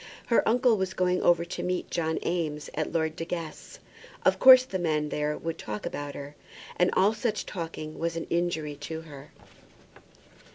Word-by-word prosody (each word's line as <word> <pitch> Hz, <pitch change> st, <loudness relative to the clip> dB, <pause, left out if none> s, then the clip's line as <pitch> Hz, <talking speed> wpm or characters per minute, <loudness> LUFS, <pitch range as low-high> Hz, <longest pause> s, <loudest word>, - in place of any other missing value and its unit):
Her 235 Hz, -, +4 dB
uncle 245 Hz, -1 st, +4 dB
was 190 Hz, -1 st, -2 dB
going 180 Hz, 0 st, +1 dB
over 170 Hz, -1 st, +3 dB
to 175 Hz, -, -5 dB
meet 180 Hz, 0 st, -2 dB
John 160 Hz, -2 st, -1 dB
Eames 155 Hz, -4 st, -2 dB
at 155 Hz, 0 st, -2 dB
Lord 160 Hz, -1 st, 0 dB
De 165 Hz, -, -4 dB
Guest's. 165 Hz, -2 st, -6 dB, 0.5 s
Of -, -, +4 dB
course 260 Hz, -1 st, +9 dB
the 190 Hz, -7 st, -4 dB
men 155 Hz, -3 st, 0 dB
there 150 Hz, 0 st, -1 dB
would 165 Hz, 0 st, -5 dB
talk 105 Hz, -1 st, -5 dB
about 145 Hz, 0 st, -5 dB
her, 145 Hz, +1 st, -8 dB, 0.4 s
and 180 Hz, -, +3 dB
all 200 Hz, +3 st, +4 dB
such 220 Hz, -1 st, -2 dB
talking 165 Hz, -4 st, -6 dB
was 165 Hz, 0 st, -1 dB
an 165 Hz, -, -3 dB
injury 170 Hz, -3 st, -1 dB
to 160 Hz, +2 st, -6 dB
her. 145 Hz, -3 st, -12 dB
165 Hz, 175 wpm, -28 LUFS, 155-180 Hz, 0.5 s, course